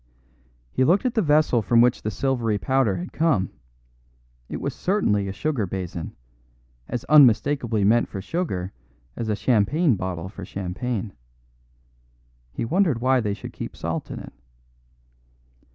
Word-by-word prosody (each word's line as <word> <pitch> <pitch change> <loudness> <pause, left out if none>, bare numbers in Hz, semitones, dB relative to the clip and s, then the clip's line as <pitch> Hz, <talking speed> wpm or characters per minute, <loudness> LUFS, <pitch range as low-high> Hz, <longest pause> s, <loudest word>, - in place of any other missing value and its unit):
He 130 - +1
looked 180 - +3
at 250 - +1
the 225 - +2
vessel 150 - +3
from 115 +2 +3
which 120 +1 +4
the 110 - -2
silvery 115 -2 0
powder 120 +1 +1
had 90 - -7
come; 150 - +1 1.0
it - - -4
was - - -3
certainly 105 - 0
a - - -3
sugar 125 -2 -2
basin; 90 -3 -5 0.7
as 120 - -4
unmistakably 130 -5 +4
meant 115 +4 +4
for 100 - -6
sugar 95 - -3 0.4
as 115 - -4
a 105 - +1
champagne 125 - +2
bottle 90 -2 -4
for 100 0 -9
champagne. 100 +4 -4 1.4
He 115 - -3
wondered 165 - +2
why 130 +1 +3
they 105 -3 -1
should - - -9
keep - - -7
salt - - -4
in - - -6
it. - - -9
115 Hz, 145 wpm, -24 LUFS, 100-140 Hz, 1.4 s, which